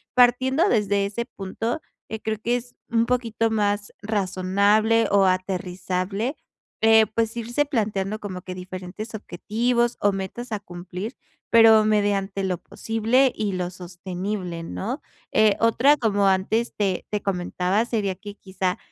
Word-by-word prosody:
partiendo 260 - +4
desde 205 - +2
ese 210 +4 -3
punto, 225 +6 -4 0.3
eh, 220 - -4
creo 220 0 -1
que 240 +1 +2
es 245 0 -10
un 230 0 +2
poquito 230 -2 0
más 205 -1 0
razonable 205 +2 +2
o 200 -1 +4
aterrizable 185 - -1 0.5
eh, 220 0 +6
pues, 225 +2 -1
irse 240 +5 0
planteando 215 -6 -1
como 185 -4 -6
que 180 0 -7
diferentes 185 +4 -7
objetivos 235 +5 -1
o 205 - +4
metas 195 +5 -5
a 210 - -1
cumplir, 185 +5 -7 0.3
pero 225 -1 +7
mediante 200 -2 +1
lo 185 -2 -1
posible 225 +8 +1
y 210 -2 -1
lo 180 -1 -2
sostenible, 180 0 -5
¿no? 230 - -4 0.3
Eh, 215 -2 +5
otra, 230 +6 +5
como 205 -5 +1
antes 195 +5 +1
te 195 -3 0
te 210 -1 -2
comentaba, 185 +1 0
sería 210 -5 -1
que 205 +2 -10
quizá 190 -2 -2
205 Hz, 140 wpm, -24 LUFS, 190-230 Hz, 0.5 s, pero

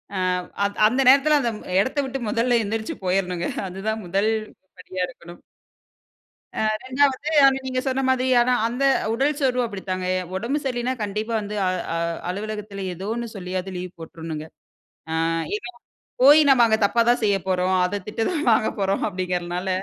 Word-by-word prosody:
அ - - -2 0.5
அந் 200 0 -1
அந்த 255 +4 +1
நேரத்தில 280 +3 +6
அந்த 240 - 0
ம் - - -13 0.2
எடத்த 265 +5 -2
விட்டு 270 0 -4
மொதல்ல 235 +2 +2
எந்திரிச்சு 220 +1 -3
போயிறணுங்க. 180 -2 0 0.2
அதுதான் 215 +4 -3
1 195 +5 +1 0.5
படியா 185 0 -4
இருக்கணும். 175 0 -13 1.2
அ. - - -6 0.3
2வது 270 +2 +1
அதான் 270 -1 +5
நீங்க 255 -1 -1
சொன்ன 265 0 0
மாதி 260 0 +2
அதான் 245 +1 +2
அந்த 250 +4 -2 0.3
உடல் 275 +5 +1
சோர்வும் 250 -2 +1
அப்படித்தாங்க, 185 -3 -4 0.3
உடம்பு 235 +9 -1
சரியில்லைனா 250 -1 -1
கண்டிப்பா 210 +2 -3
வந்து 210 0 -5
அ - - +2 0.3
அ 165 - -1 0.3
அலுவலகத்தில 205 0 -5
ஏதோ 190 +4 -6
ஒண்ணு 235 0 -4
சொல்லியாது 185 0 -4
லீவ் 180 0 -6
போட்றணுங்க. 160 -1 -7 0.7
அ. - - -1 0.4
ஏன்னா, 385 -3 -8 0.5
போய் 295 +3 +8
நம்ம 260 -3 +6
அங்க 220 -1 +3
தப்பா 235 +3 +2
தான் 245 - +3
செய்யப் 195 -3 +1
போறோம். 185 0 +1
அத 200 +2 -3
திட்டு 225 +1 -2
தான் 310 -6 -2
வாங்க 220 0 +3
போறோம் 195 0 0
அப்படிங்கிறதனால, 180 0 -3
215 Hz, 160 wpm, -23 LUFS, 185-255 Hz, 1.2 s, போய்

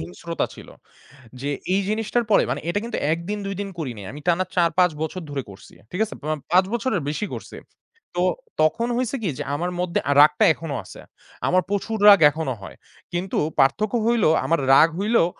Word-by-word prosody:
হিংস্রতা 90 - -4
ছিল। - - -13 0.7
যে 140 +2 -2 0.2
এই 195 - +3
জিনিসটার 225 +2 0
পরে 205 - +5
মানে - - -2
এইটা 205 +4 0
কিন্তু 235 - -4
১ 165 - 0
দিন 210 0 -2
২ 195 - -3
দিন 200 - -3
করিনি। 120 -9 -5
আমি 145 - -9
টানা 175 +1 +2
৪-৫ 180 0 +3
বছর 180 +3 -4
ধরে 140 -2 -3
করছি। 100 0 -14 0.2
ঠিক 180 - -5
আছে? 220 - -8
প - - -14 0.3
পাঁচ 185 +1 +6
বছরের 230 -4 0
বেশি 155 +8 -2
করছি। - - -9 0.6
তো 175 - +1 0.4
তখন 225 +10 +2
হইছে 255 +2 -1
কি? 195 - 0
যে - - -2
আমার 175 +4 -2
মধ্যে 180 -1 0 0.2
রাগটা 150 0 +6
এখনো 160 -3 -6
আছে। - - -12 0.5
আমার 185 0 +3
প্রচুর 210 +2 -2
রাগ 200 -3 +9
এখনো 155 -3 -3
হয়। - - -10 0.4
কিন্তু 180 +2 -3 0.2
পার্থক্য 210 - +2
হইলো 235 -6 +3 0.2
আমার 165 -3 +1
রাগ 160 +4 +7
হইলেও 210 -2 +3
180 Hz, 185 wpm, -23 LUFS, 155-210 Hz, 0.7 s, রাগ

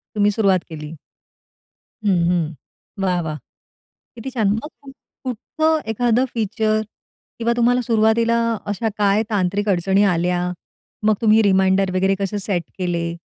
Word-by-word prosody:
तुम्ही 205 0 +3
सुरुवात 195 -4 +2
केली. 155 0 -8 1.1
हं, 185 -4 +3
हं. 165 -3 0 0.5
वाह, 180 -2 +1
वाह, 155 -2 -4 0.8
किती 240 +3 -6
छान! 220 -6 +1
मग 225 +8 -3
कुठ 270 -1 -12 0.3
कुठचं 315 +6 0
एखादं 240 +2 +2
फीचर 215 -1 0 0.6
किंवा 235 0 +1
तुम्हाला 245 +1 +3
सुरुवातीला 230 0 +2 0.3
अशा 225 +2 -1
काय 205 +1 +3
तांत्रिक 205 0 0
अडचणी 195 +2 +2
आल्या, 180 -1 +1 0.5
मग 215 0 +3
तुम्ही 220 0 +5
रिमाइंडर 190 -1 +3
वगैरे 190 +1 +2
कसे 200 +1 -2
सेट 185 -3 -2
केले? 170 -2 -1
205 Hz, 130 wpm, -20 LUFS, 180-225 Hz, 1.1 s, तुम्ही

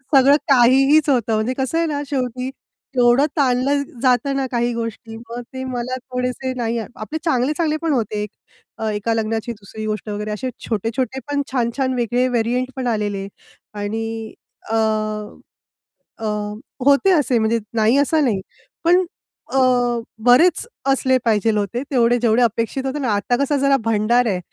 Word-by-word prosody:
सगळं 275 +1 +7
काहीहीच 270 +4 +5
होतं 235 -5 +2
म्हणजे 220 +4 0
कसं 265 +4 -1
आहे 335 - +2
ना, 290 -2 -2
शेवटी 255 -2 -2 0.5
एवढं 245 +3 +5
ताणलं 275 +1 +2 0.2
जातं 260 +1 +2
ना 270 - 0
काही 240 0 0
गोष्टी 230 -1 -5
मग 235 +1 -7
ते 260 - -5
मला 255 0 -3
थोडेसे 250 0 -3
नाही 235 -1 -1
आपले 225 +6 -6
चांगले-चांगले 305 +2 +1
पण 325 -2 +1
होते. 215 -4 -1 0.5
अ, 220 - -2
"एका 210 +2 -1
लग्नाची 225 +1 -2
दुसरी 215 0 -8
गोष्ट" 215 0 -3
वगैरे 210 +1 -4
असे 235 +5 -3 0.2
छोटे-छोटे 230 +4 -2
पण 285 0 +1
छान-छान 260 +1 0
वेगळे 245 +1 +1
व्हेरियंट 250 +1 0
पण 260 -2 -3
आलेले. 205 -4 -1 0.5
आणि 210 +2 -3 0.6
अ, 225 - 0 1.4
अ, 225 - -5 0.6
होते 280 +7 +5
असे 290 -8 +3
म्हणजे 225 +1 +1 0.2
नाही 220 +3 +3
असा 290 +3 +3
नाही. 225 -9 +1 0.4
पण 355 +2 +4 0.5
अ, 270 - +3 0.7
बरेच 315 - +5 0.3
असले 260 -1 +3
पाहिजे 225 -1 +2
होते 210 +4 -2
तेवढे 240 -2 +3
जेवढे 235 0 +3
अपेक्षित 230 +3 0
होते 270 +2 -2
ना, 260 -4 -1
आता 205 +4 +1
कसा 285 +1 +1
जरा 275 0 +3
भंडार 225 +2 +2
आहे, 190 -4 0
245 Hz, 150 wpm, -20 LUFS, 225-270 Hz, 1.4 s, सगळं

